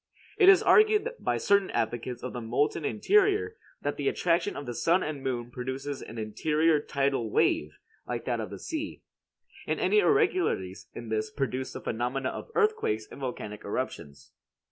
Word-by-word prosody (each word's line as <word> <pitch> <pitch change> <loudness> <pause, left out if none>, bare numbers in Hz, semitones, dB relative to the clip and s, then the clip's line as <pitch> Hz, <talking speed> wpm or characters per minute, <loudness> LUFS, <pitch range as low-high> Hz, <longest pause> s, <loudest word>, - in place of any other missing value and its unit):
It 385 -2 +8
is 390 - +7
argued 430 +1 +5
by - - 0
certain 200 -1 +3
advocates 120 +1 -2
of 125 - -5
the 125 - -4
molten 140 +8 0
interior 415 - +2 0.3
that - - -2
the - - -2
attraction 170 - +1
of 145 - -6
the 120 - -4
sun 170 +10 +2
and 150 -3 -4
moon 120 -2 -3
produces 130 +3 -5
an 115 - -9
interior 150 +9 +1
tidal 135 -5 -1
wave, 75 -6 +1 0.3
like 120 -1 -4
that 120 -2 -1
of 110 - -4
the - - -7
sea; 315 -1 -5 0.6
and - - -1
any 425 - +4
irregularities 370 - +1
in 120 - -7
this 110 0 -1
produce 130 -1 -3
the - - -7
phenomena 125 +3 -2
of - - -7
earthquakes 425 - +1
and - - -10
volcanic 105 -5 -5
eruptions. 70 -1 -5
135 Hz, 165 wpm, -28 LUFS, -, 0.6 s, It